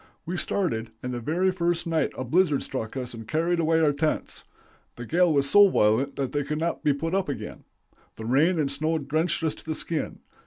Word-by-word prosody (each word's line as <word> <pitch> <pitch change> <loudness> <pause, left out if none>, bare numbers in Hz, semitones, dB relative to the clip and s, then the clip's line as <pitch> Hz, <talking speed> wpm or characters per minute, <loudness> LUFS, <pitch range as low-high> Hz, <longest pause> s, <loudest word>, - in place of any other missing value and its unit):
We 175 +2 -3
started, 135 - -1
and 125 0 -3
the 120 - -3
very 175 +10 +1
first 175 -2 -1
night 160 -3 0
a - - -2
blizzard 150 +2 +2
struck 130 -1 -5
us 125 -2 -4
and 115 -1 -9
carried 170 +4 0
away 165 0 +2
our 150 -2 +3
tents. 155 +2 -2 0.5
The 120 - -7
gale 175 +6 +3
was 140 -2 +2
so 205 +7 +7
violent 125 - +2
that 135 -2 -2
they 145 - 0
could 150 +2 -3
not 165 +2 -2
be 150 - +4
put 160 +5 -2
up 195 -4 0
again; 140 - -6 0.5
the 110 - -8
rain 150 +9 +3
and 145 -3 0
snow 155 +3 0
drenched 155 +3 -1
us 160 - +1
to - - -14
the 160 -1 -3
skin. 160 -1 -4
155 Hz, 220 wpm, -26 LUFS, 135-170 Hz, 0.5 s, so